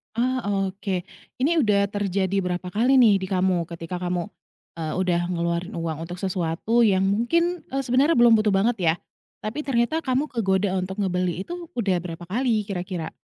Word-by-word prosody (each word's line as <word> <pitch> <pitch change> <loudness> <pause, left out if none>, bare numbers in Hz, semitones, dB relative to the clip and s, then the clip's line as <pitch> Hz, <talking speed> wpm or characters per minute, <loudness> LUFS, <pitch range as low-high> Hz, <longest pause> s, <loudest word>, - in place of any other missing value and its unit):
Ah, 255 +2 +1
oke. 195 -2 -1 0.3
Ini, 315 +6 +2
udah 200 -5 +2
terjadi 195 -1 0
berapa 180 0 -3
kali 245 +7 +3
nih, 220 -6 +6
di 190 - -4
kamu? 185 -3 +1
Ketika 170 +1 -6
kamu, 180 -1 -1 0.6
eee, 155 -1 -3
udah 175 -2 +1
ngeluarin 170 +2 -2
uang 165 -1 -4
untuk 175 - -6
sesuatu 185 +4 -1
yang 190 -1 +3
mungkin, 335 - +1
eee, 270 +1 -2
sebenarnya 265 +6 +3
belum 240 -1 +6
butuh 215 - 0
banget, 220 +5 +2
ya? 165 -2 +3 0.5
Tapi, 220 +8 -4
ternyata 255 +5 +1
kamu 275 0 -1
kegoda 195 -4 +1
untuk 190 +2 -3
ngebeli 180 -1 -1
itu, 350 - -7
udah 200 -6 +1
berapa 175 0 -7
kali, 220 +3 0
kira-kira? 180 -4 -4
195 Hz, 165 wpm, -24 LUFS, 180-235 Hz, 0.6 s, nih